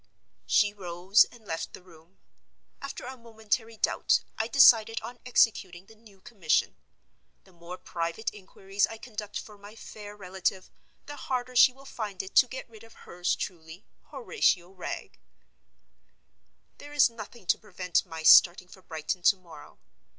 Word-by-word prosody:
She 205 Hz, -1 st, +3 dB
rose, 185 Hz, +1 st, +2 dB
and 235 Hz, -3 st, -18 dB
left 165 Hz, -4 st, -5 dB
the -, -, -11 dB
room. 170 Hz, +1 st, -20 dB, 0.6 s
After 275 Hz, -2 st, -7 dB
a 260 Hz, +1 st, -7 dB
momentary 225 Hz, -1 st, -4 dB
doubt, -, -, +1 dB
I 220 Hz, -, -2 dB
decided 230 Hz, -3 st, +6 dB
on 245 Hz, 0 st, -9 dB
executing 190 Hz, -7 st, +1 dB
the 220 Hz, -, -17 dB
new 215 Hz, -3 st, -21 dB
commission. 190 Hz, -8 st, 0 dB, 0.7 s
The 190 Hz, -, -22 dB
more 170 Hz, +1 st, -10 dB
private 170 Hz, +4 st, -4 dB
inquiries 195 Hz, 0 st, -2 dB
I 225 Hz, -, -9 dB
conduct 210 Hz, -3 st, -7 dB
for 210 Hz, -2 st, -12 dB
my 205 Hz, +2 st, -13 dB
fair 210 Hz, -2 st, -11 dB
relative 190 Hz, -1 st, -3 dB, 0.3 s
the 290 Hz, 0 st, -9 dB
harder 255 Hz, -2 st, -4 dB
she 250 Hz, -, +7 dB
will 270 Hz, +2 st, -18 dB
find 210 Hz, -8 st, -6 dB
it 190 Hz, -, -11 dB
to 255 Hz, -, +7 dB
get 260 Hz, +2 st, -8 dB
rid 225 Hz, -2 st, -16 dB
of 225 Hz, -, -17 dB
hers 175 Hz, 0 st, -1 dB
truly, 165 Hz, 0 st, -8 dB, 0.2 s
Horatio 190 Hz, -, 0 dB
Wragge. 185 Hz, -2 st, -7 dB, 1.6 s
There 290 Hz, 0 st, -11 dB
is 290 Hz, -2 st, +5 dB
nothing 230 Hz, -2 st, -11 dB
to -, -, +2 dB
prevent 180 Hz, -4 st, -1 dB
my 160 Hz, -1 st, -9 dB
starting 180 Hz, +3 st, +6 dB
for 190 Hz, -, -15 dB
Brighton 160 Hz, +1 st, -5 dB
to 185 Hz, -, +5 dB
morrow. 170 Hz, -5 st, -15 dB
205 Hz, 155 wpm, -28 LUFS, 180-230 Hz, 1.6 s, she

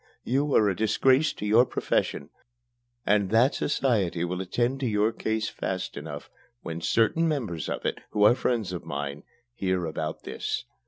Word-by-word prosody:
You 140 Hz, +3 st, +1 dB
are 105 Hz, -, +5 dB
a 95 Hz, -, +1 dB
disgrace 130 Hz, -, +3 dB
to -, -, -6 dB
your 110 Hz, +4 st, +6 dB
profession, 70 Hz, -, -1 dB, 0.7 s
and 100 Hz, -2 st, +2 dB
that 115 Hz, +6 st, +4 dB
society 100 Hz, -, 0 dB
will 90 Hz, +1 st, -3 dB
attend 120 Hz, +8 st, -1 dB
to 135 Hz, -, -1 dB
your 105 Hz, 0 st, +2 dB
case 110 Hz, -1 st, -2 dB
fast 95 Hz, -3 st, -4 dB
enough 75 Hz, -2 st, -7 dB, 0.4 s
when 85 Hz, 0 st, -5 dB
certain 115 Hz, -, +2 dB
members 110 Hz, -, -2 dB
of -, -, -4 dB
it, -, -, -1 dB
who 105 Hz, -, +1 dB
are 105 Hz, -, +8 dB
friends 120 Hz, -6 st, -1 dB
of 90 Hz, -, -5 dB
mine, 70 Hz, 0 st, -4 dB, 0.3 s
hear 95 Hz, -5 st, -1 dB
about 80 Hz, -1 st, -4 dB
this. -, -, -3 dB
105 Hz, 165 wpm, -27 LUFS, 90-120 Hz, 0.7 s, are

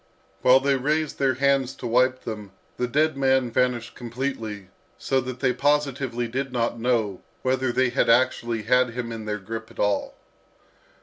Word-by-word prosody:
While 130 Hz, +1 st, +6 dB
they 135 Hz, 0 st, +1 dB
raised 150 Hz, +3 st, -1 dB
their 135 Hz, -2 st, +2 dB
hands 135 Hz, -1 st, +1 dB
to -, -, -9 dB
wipe 130 Hz, +2 st, +2 dB
them, 105 Hz, -3 st, -7 dB, 0.2 s
the 125 Hz, -, 0 dB
dead 155 Hz, +5 st, +2 dB
man 130 Hz, -2 st, +2 dB
vanished 120 Hz, -1 st, 0 dB
completely, 115 Hz, -5 st, -5 dB, 0.3 s
so 135 Hz, -1 st, 0 dB
that 130 Hz, 0 st, -7 dB
they 130 Hz, -2 st, +2 dB
positively 135 Hz, -3 st, 0 dB
did 130 Hz, +3 st, -3 dB
not 120 Hz, -1 st, -1 dB
know 115 Hz, -5 st, 0 dB, 0.2 s
whether 130 Hz, -1 st, +1 dB
they 130 Hz, +1 st, +2 dB
had -, -, +1 dB
actually 120 Hz, -2 st, +2 dB
had 125 Hz, +1 st, +2 dB
him 120 Hz, -2 st, -4 dB
in 110 Hz, -1 st, -6 dB
their 105 Hz, -1 st, -2 dB
grip 110 Hz, +3 st, -7 dB
at 115 Hz, -, -17 dB
all. 100 Hz, 0 st, 0 dB
125 Hz, 170 wpm, -24 LUFS, 115-130 Hz, 0.3 s, While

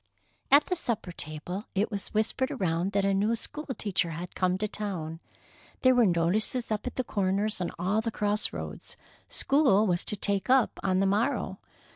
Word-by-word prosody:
At 285 Hz, +2 st, +6 dB
the 365 Hz, -, -1 dB
supper 235 Hz, -, -1 dB
table 170 Hz, +6 st, -5 dB
it 205 Hz, +4 st, +1 dB
was 200 Hz, -2 st, -4 dB
whispered 220 Hz, +5 st, 0 dB
around 185 Hz, -, -1 dB
that 200 Hz, 0 st, +2 dB
a 195 Hz, -, +2 dB
new 210 Hz, +4 st, +2 dB
school 300 Hz, +6 st, -6 dB
teacher 200 Hz, -, -1 dB
had 170 Hz, +2 st, -6 dB
come 185 Hz, 0 st, +1 dB
to 215 Hz, +2 st, -1 dB
town. 180 Hz, -7 st, -4 dB, 0.6 s
There 255 Hz, 0 st, +6 dB
were 245 Hz, -3 st, +5 dB
notices 190 Hz, +8 st, +1 dB
up 215 Hz, +3 st, -2 dB
at 250 Hz, -, -5 dB
the 255 Hz, -, 0 dB
corners 200 Hz, -1 st, 0 dB
and 175 Hz, -, -2 dB
all 190 Hz, +6 st, +1 dB
the 230 Hz, -, -2 dB
cross 210 Hz, 0 st, 0 dB
roads. -, -, -7 dB, 0.3 s
School 270 Hz, -8 st, +4 dB
was 175 Hz, -4 st, +1 dB
to -, -, +1 dB
"take 200 Hz, +2 st, -1 dB
up" 260 Hz, -3 st, +3 dB
on 190 Hz, -1 st, +1 dB
the -, -, +3 dB
morrow. 205 Hz, +4 st, 0 dB
205 Hz, 185 wpm, -28 LUFS, 185-230 Hz, 0.6 s, At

